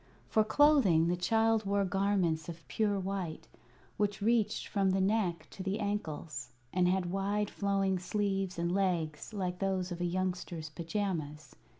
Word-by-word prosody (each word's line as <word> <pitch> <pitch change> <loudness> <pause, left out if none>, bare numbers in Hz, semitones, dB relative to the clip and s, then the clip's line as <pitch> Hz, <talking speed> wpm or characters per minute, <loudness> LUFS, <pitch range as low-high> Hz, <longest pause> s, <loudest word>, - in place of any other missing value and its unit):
For 220 - +3
clothing 215 - +4
the 175 - +2
child 225 +4 +2
wore 200 0 +1
garments 185 -5 +1
of 165 0 -9
pure 205 -2 0
white, 190 -4 -4 0.5
which 205 0 0
reached 225 0 +1
from 195 -2 +1
the 190 +1 +2
neck 190 -4 +1
to - - -8
the 195 +3 -2
ankles, 160 - -3 0.2
and 180 0 +3
had 180 -1 +1
wide 200 +2 0
flowing 195 -2 0
sleeves 195 0 -1
and 170 0 0
legs, 170 -6 -1
like 180 -4 -3
those 190 -2 -1
of 175 0 -4
a - - +1
youngster's 175 -3 -2
pajamas. 165 -4 -3
190 Hz, 155 wpm, -32 LUFS, 175-205 Hz, 0.5 s, clothing